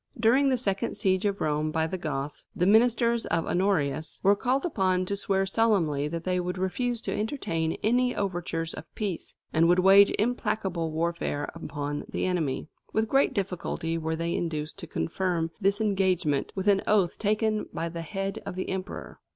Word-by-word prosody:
During 255 +5 +4
the 260 - +2
second 195 -5 -1
siege 190 -2 +1
of 200 -1 -1
Rome 150 0 0
by 160 +1 0
the 165 - -3
Goths, 145 -3 -4
the 180 - +1
ministers 235 +2 +3
of 165 -1 0
Honorius 160 -5 0
were 200 +1 +6
called 260 - 0
upon 185 - +1
to 200 - -2
swear 195 -1 +1
solemnly 190 -9 +2
that 165 +2 -4
they 185 0 0
would 180 +1 -3
refuse 230 +6 -1
to - - -2
entertain 170 - -1
any 245 +3 +2
overtures 175 -4 -2
of - - -8
peace, 200 -6 -3 0.2
and 165 +1 +4
would 175 +1 +4
wage 195 +2 +7
implacable 210 -7 -1
warfare 160 -2 -2
upon 145 -3 -4
the - - -2
enemy. 160 -7 -1 0.2
With 220 0 +1
great 275 0 +3
difficulty 180 -4 -2
were 160 0 -2
they 170 +1 -2
induced 155 -2 -3
to 170 - -7
confirm 165 0 -1
this 200 +2 +2
engagement 190 -9 +1
with 190 +1 -3
an 200 -1 +5
oath 200 -5 +2
taken 215 0 0
by 165 - -3
the 170 0 -5
head 195 +3 -4
of 200 - -6
the 185 - -3
emperor. 190 +1 -6
185 Hz, 175 wpm, -27 LUFS, 165-210 Hz, 0.2 s, wage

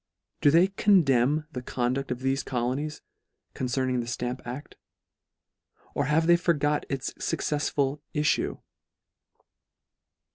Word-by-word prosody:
Do - - +6
they 170 +6 +5
con 200 -2 +4
demn 135 +3 +2
the 125 - -5
conduct 125 +2 -2
of 125 0 -3
thefe 135 0 0
colonies, 130 +5 -2 0.5
concern 130 0 -1
ing 125 - +1
the 120 - -3
Stamp 125 +1 -3
acl 125 +4 -5
f - - -19 1.2
Or - - 0
have 155 +3 +2
they 170 +1 +6
forgot 150 -4 +1
its 135 -2 -3
fuccefsful 145 -1 -1 0.2
iiTue 150 0 +1
135 Hz, 130 wpm, -27 LUFS, 125-150 Hz, 1.2 s, Do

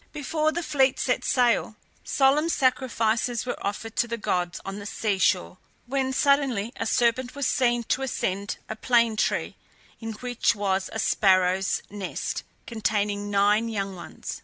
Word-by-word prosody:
Before 305 +2 0
the 345 +2 -3
fleet 270 -4 +2
set 250 - 0
sail 240 -3 +2 0.3
solemn 285 +4 +3
sacrifices 245 -4 +1
were 250 - -4
offered 215 +2 -4
to 240 - +2
the 235 0 -3
gods 180 -4 -1
on 195 +1 -5
the 205 - -7
sea 205 -2 -1
shore, 185 -1 +1 0.3
when 265 +1 -1
suddenly 265 -5 +2
a 225 - -2
serpent 245 +3 +1
was 280 -1 -2
seen 240 -2 +2
to 260 - -1
ascend 200 -6 -2
a 220 - -5
plane 235 -1 +2
tree, - - -1 0.4
in 225 -1 -5
which 245 +1 0
was 195 -2 -1
a - - -5
sparrow's 190 -3 +2
nest 200 -2 -4 0.2
containing 205 -2 -1
nine 205 +3 +3
young 195 -3 -3
ones. 175 - -8
225 Hz, 155 wpm, -26 LUFS, 205-255 Hz, 0.4 s, solemn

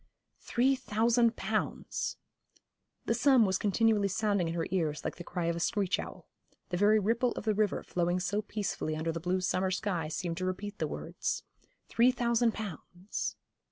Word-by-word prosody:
Three 260 +3 +2
thousand 230 0 +2
pounds! - - -2 0.9
The - - +2
sum 265 -6 +5
was 190 -1 +1
continually 210 0 +3
sounding 200 -2 +1
in 165 - -3
her 165 - -1
ears 160 -5 0
like - - -3
the 175 - -7
cry 175 0 -3
of 170 0 +1
a - - -3
screech 195 +1 +1
owl. - - -8 0.4
The 180 - -1
very 205 +3 +5
ripple 230 +4 +1
of - - -6
the 215 - +3
river 210 -1 +1
flowing 175 +1 0
so 205 +3 0
peacefully 205 -7 -3
under 160 +1 -1
the 165 - -4
blue 180 +3 0
summer 185 +1 +1
sky 185 -4 -1
seemed 165 +2 -3
to 185 - -2
repeat 200 +3 -4
the - - 0
words. - - -3 0.4
Three 235 +2 +4
thousand 235 -2 +1
pounds! 190 -1 -5
200 Hz, 175 wpm, -31 LUFS, 175-220 Hz, 0.9 s, sum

